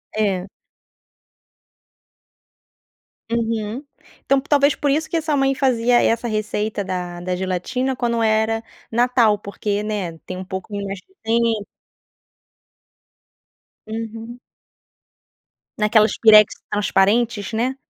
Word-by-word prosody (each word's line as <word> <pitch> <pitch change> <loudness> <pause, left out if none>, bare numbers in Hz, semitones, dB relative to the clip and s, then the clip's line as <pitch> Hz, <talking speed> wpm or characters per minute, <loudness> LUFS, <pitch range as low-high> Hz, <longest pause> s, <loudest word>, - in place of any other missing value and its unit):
É. 200 -3 0 2.8
Uhum. 230 +2 -2 0.4
Então, 275 -1 +3
talvez 285 0 +3
por 290 - -1
isso 310 +3 0
que - - -3
a - - 0
sua 305 -2 0
mãe 270 0 +2
fazia 245 -3 +3
essa 235 +1 +1
receita 215 -1 -2
da 180 -2 -4
da 180 0 -2
gelatina 190 +9 -2
quando 235 -2 -1
era 220 +1 +1 0.3
Natal, 235 -2 +3
porque, 205 0 -3
né, 200 -6 -3
tem 185 - -8
um 185 - -5
pouquinho 200 +2 -5
mais 195 -1 -5
de 380 - -28
tempo. 225 -2 +1 2.2
Uhum. 225 +2 -6 1.4
Naquelas 215 0 +3
pirex 215 -2 +7 0.2
transparentes, 210 +2 +1
né? 245 +4 0
220 Hz, 105 wpm, -21 LUFS, 205-240 Hz, 2.8 s, pirex